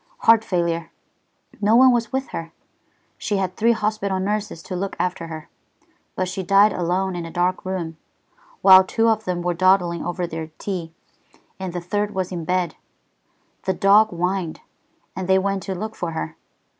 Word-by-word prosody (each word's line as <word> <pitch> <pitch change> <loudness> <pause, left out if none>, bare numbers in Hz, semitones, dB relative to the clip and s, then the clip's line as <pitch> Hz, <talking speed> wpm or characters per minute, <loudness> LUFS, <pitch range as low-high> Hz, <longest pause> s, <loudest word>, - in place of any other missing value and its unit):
"Heart 225 -1 +6
failure. 170 -3 -1 0.7
No 210 +2 +4
one 260 +1 +7
was 235 -1 0
with 265 0 -2
her. 165 0 -6 0.7
She 205 - -1
had 185 -1 -2
three 235 +2 +3
hospital 210 -3 -1
nurses 205 -3 -2
to 185 - -6
look 195 +2 -3
after 175 -2 -2
her, 160 -1 -8 0.7
but 185 - -1
she 185 +1 -4
died 200 +3 +5
alone 180 +2 -1
in 175 - -4
a 165 - -7
dark 180 +2 0
room, 175 -4 -4 0.7
while 190 -1 +9
two 225 +4 +1
of 220 -1 0
them 175 -1 -2
were 175 0 0
dawdling 180 -1 +2
over 175 +1 -2
their 160 -1 -5
tea, 180 -5 -4 0.7
and 190 -1 -4
the 175 0 -4
third 205 +3 -2
was 185 -1 -2
in 170 -3 -4
bed. 180 -1 0 0.9
The 190 - +1
dog 205 +3 +5
whined, 180 -1 -2 0.5
and 185 0 -4
they 190 0 +5
went 195 0 0
to 190 - -1
look 215 +4 -5
for 170 -2 -4
her. 80 - -4
185 Hz, 175 wpm, -22 LUFS, 175-205 Hz, 0.9 s, while